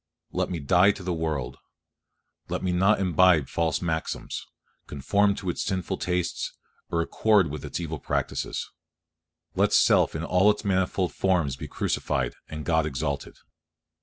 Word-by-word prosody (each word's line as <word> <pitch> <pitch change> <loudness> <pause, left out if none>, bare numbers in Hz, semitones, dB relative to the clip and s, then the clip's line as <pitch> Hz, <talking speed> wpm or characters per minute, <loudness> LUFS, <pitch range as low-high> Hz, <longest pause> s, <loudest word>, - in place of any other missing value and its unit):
Let - - -1
me 85 - -3
die 90 +7 +4
to 95 - -10
the 90 -1 -1
world; 75 -6 -3 0.9
let - - -3
me 95 - 0
not 95 +4 +3
imbibe 90 -3 +4
its - - -15
false 80 0 0
maxims, 80 -2 -3 0.4
conform 100 +9 +1
to 95 - -4
its - - -5
sinful 95 -3 -2
tastes, 90 -1 -2 0.4
or 85 - +1
accord 100 -3 +2
with 75 -1 -6
its - - -4
evil 80 -2 -4
practices. - - -2 0.9
Let - - +2
self - - +4
in 80 - -3
all 90 +4 +4
its 105 0 0
manifold 95 -1 0
forms 85 -8 +1
be - - -7
crucified, 65 -5 -1 0.2
and 75 0 -6
God 80 -2 +2
exalted. 70 0 -3
85 Hz, 155 wpm, -26 LUFS, 75-95 Hz, 0.9 s, die